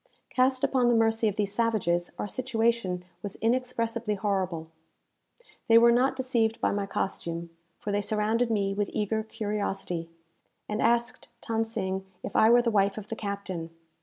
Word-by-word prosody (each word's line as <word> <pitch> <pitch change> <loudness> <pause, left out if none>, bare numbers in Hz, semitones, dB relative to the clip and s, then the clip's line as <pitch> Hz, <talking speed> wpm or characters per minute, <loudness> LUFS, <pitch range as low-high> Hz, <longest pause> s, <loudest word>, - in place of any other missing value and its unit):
Cast 255 0 +2
upon 255 -2 +3
the 240 - +4
mercy 225 0 +3
of 205 - -1
these 205 -2 -1
savages, 185 -7 +1
our - - -3
situation 225 -6 0 0.2
was 200 -2 -5
inexpressibly 230 -2 0
horrible. 190 -5 -1 1.0
They 230 - +7
were 235 +1 +7
not 255 +3 +3
deceived 235 -4 +1
by - - +1
my 200 0 -1
costume; 170 -3 -3 0.3
for 205 - -4
they 205 0 +1
surrounded 220 +3 +1
me 200 -3 +1
with 205 0 -1
eager 215 +1 0
curiosity, 205 -6 -3 0.6
and 210 +1 -2
asked 235 0 +1 0.2
Than 225 -1 +1
Sing 190 -4 -2 0.2
if - - -6
I 220 - +6
were 240 +1 +6
the 235 - +1
wife 200 -1 +2
of 210 -1 -7
the 225 - -3
captain. 200 -6 -4
215 Hz, 165 wpm, -28 LUFS, 195-230 Hz, 1.0 s, They